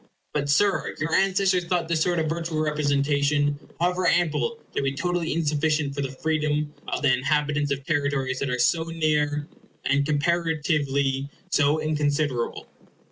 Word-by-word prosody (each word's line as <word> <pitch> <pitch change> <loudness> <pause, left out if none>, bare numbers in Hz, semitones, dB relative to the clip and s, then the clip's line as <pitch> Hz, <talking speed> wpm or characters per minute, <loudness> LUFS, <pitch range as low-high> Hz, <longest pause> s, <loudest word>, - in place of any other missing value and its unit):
But, 145 -1 -1
Sir, 195 +6 +2
your 160 +1 -2
ancestors 190 -2 +2
thought 175 -1 0
this 165 -1 0
sort 175 +1 +1
of 160 -1 0
virtual 165 0 -2
representation, 145 -1 +1 0.2
however 180 +1 +1
ample, 175 - +1 0.2
to - - +1
be 135 0 0
totally 175 +2 -1
insufficient 150 -2 0
for 140 - -3
the 135 - -2
freedom 150 +1 -1
of - - -3
the 135 -3 +5
inhabitants 145 +2 0
of 140 -1 -2
territories 140 -4 0
that 140 - -2
are 125 - -1
so 160 +6 +2
near, 150 -3 0 0.4
and 140 +1 +2
comparatively 145 -3 0 0.2
so 150 0 +3
inconsiderable. 145 -4 -1
150 Hz, 145 wpm, -25 LUFS, 140-165 Hz, 0.4 s, the